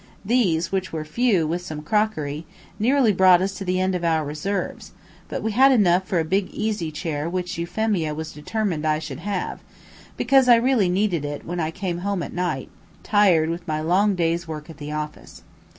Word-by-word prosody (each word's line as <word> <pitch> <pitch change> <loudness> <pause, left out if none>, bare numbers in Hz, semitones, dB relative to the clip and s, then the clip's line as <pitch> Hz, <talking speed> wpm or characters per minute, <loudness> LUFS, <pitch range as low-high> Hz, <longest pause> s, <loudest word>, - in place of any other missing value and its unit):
These, 195 -8 +1
which 190 -1 -2
were 155 -1 -4
few, 195 0 +2
with 170 +3 -2
some 155 -4 -7
crockery, 160 -6 -1 0.3
nearly 245 0 +3
brought 185 -1 +6
us 195 +2 -1
to - - -4
the 185 0 0
end 185 0 +1
of 180 -1 -2
our 160 -2 +1
resources, 170 +7 -4 0.4
but - - -4
we 220 - 0
had 265 +5 +6
enough 190 -6 +3
for 185 - 0
a 160 - 0
big 190 +4 0
easy 210 -7 -2
chair 155 0 -3
which 180 0 -3
Euphemia 175 -3 -1
was 160 +1 -5
determined 170 +1 -2
I 155 -1 +2
should 155 -4 -6
have, 200 -2 -3 0.6
because 265 0 +4
I 240 - +9
really 230 -5 +2
needed 180 -4 +1
it 145 0 -5
when 175 +1 -4
I 160 -1 0
came 180 0 -4
home 195 -1 -2
at - - -7
night, 175 -7 -2 0.3
tired 180 -7 +3
with 170 +1 -6
my 155 -1 -1
long 190 +6 +2
day's 170 -1 0
work 155 0 -7
at 155 - -14
the 150 0 -7
office. 150 0 -6
180 Hz, 200 wpm, -23 LUFS, 160-205 Hz, 0.6 s, I